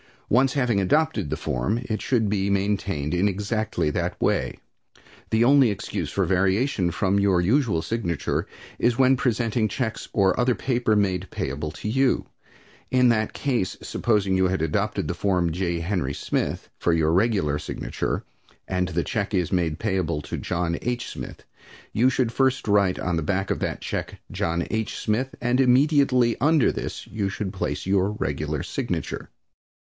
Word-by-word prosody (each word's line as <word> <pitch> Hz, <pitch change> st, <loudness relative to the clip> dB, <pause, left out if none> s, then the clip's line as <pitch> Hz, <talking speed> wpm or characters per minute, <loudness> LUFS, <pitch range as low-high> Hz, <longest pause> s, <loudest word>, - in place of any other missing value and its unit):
Once 130 Hz, +3 st, +3 dB
having 125 Hz, -7 st, +1 dB
adopted 150 Hz, -, +1 dB
the -, -, -1 dB
form, 65 Hz, -, -1 dB
it 110 Hz, -4 st, -3 dB
should 115 Hz, -5 st, +1 dB
be 100 Hz, -1 st, 0 dB
maintained 100 Hz, -6 st, 0 dB
in 90 Hz, +3 st, +2 dB
exactly 105 Hz, -3 st, -1 dB
that -, -, -2 dB
way. -, -, 0 dB, 0.7 s
The 110 Hz, +1 st, +3 dB
only 135 Hz, -1 st, +6 dB
excuse 100 Hz, -, -3 dB
for -, -, 0 dB
variation 95 Hz, +2 st, +1 dB
from 95 Hz, +3 st, +1 dB
your 95 Hz, -3 st, +3 dB
usual 105 Hz, -, +2 dB
signature 105 Hz, -9 st, -2 dB, 0.3 s
is 120 Hz, 0 st, +2 dB
when 130 Hz, 0 st, +5 dB
presenting 115 Hz, -3 st, +1 dB
checks 110 Hz, +2 st, -3 dB
or 95 Hz, -1 st, +3 dB
other 125 Hz, 0 st, +3 dB
paper 120 Hz, -4 st, +1 dB
made 95 Hz, -3 st, 0 dB
payable 70 Hz, +3 st, -3 dB
to 105 Hz, -, -5 dB
you. 135 Hz, +3 st, +2 dB, 0.6 s
In 125 Hz, -1 st, +4 dB
that 110 Hz, -2 st, +1 dB
case, 120 Hz, -9 st, -1 dB
supposing 105 Hz, -5 st, +1 dB
you 95 Hz, 0 st, +3 dB
had 95 Hz, -3 st, -1 dB
adopted 100 Hz, 0 st, -1 dB
the 85 Hz, -, -1 dB
form 90 Hz, -2 st, +1 dB
J. 85 Hz, 0 st, -1 dB
Henry 85 Hz, -6 st, -1 dB
Smith -, -, -2 dB
for 85 Hz, -, +2 dB
your 80 Hz, -1 st, +2 dB
regular 95 Hz, -6 st, +2 dB
signature, 75 Hz, -, -3 dB, 0.4 s
and 90 Hz, -1 st, 0 dB
the 85 Hz, -1 st, -1 dB
check 105 Hz, -1 st, -2 dB
is 90 Hz, -3 st, 0 dB
made 85 Hz, -4 st, 0 dB
payable 95 Hz, -7 st, -1 dB
to -, -, -5 dB
John 85 Hz, -1 st, -2 dB
H. 120 Hz, 0 st, -2 dB
Smith, -, -, -8 dB, 0.5 s
you 120 Hz, +4 st, +4 dB
should 125 Hz, -2 st, 0 dB
first 130 Hz, -1 st, +1 dB
write 100 Hz, -3 st, +3 dB
on 90 Hz, -2 st, -1 dB
the -, -, 0 dB
back 95 Hz, +4 st, -1 dB
of -, -, -1 dB
that -, -, -3 dB
check -, -, -4 dB
"John 85 Hz, +1 st, -1 dB
H. 110 Hz, -1 st, -2 dB
Smith," 120 Hz, +5 st, -1 dB
and 120 Hz, +1 st, +1 dB
immediately 130 Hz, -2 st, +4 dB
under 150 Hz, 0 st, +4 dB
this -, -, -5 dB
you 100 Hz, -3 st, -2 dB
should 100 Hz, -1 st, -4 dB
place -, -, -3 dB
your 95 Hz, +1 st, +2 dB
regular -, -, -2 dB
signature. -, -, -4 dB
100 Hz, 165 wpm, -24 LUFS, 90-120 Hz, 0.7 s, only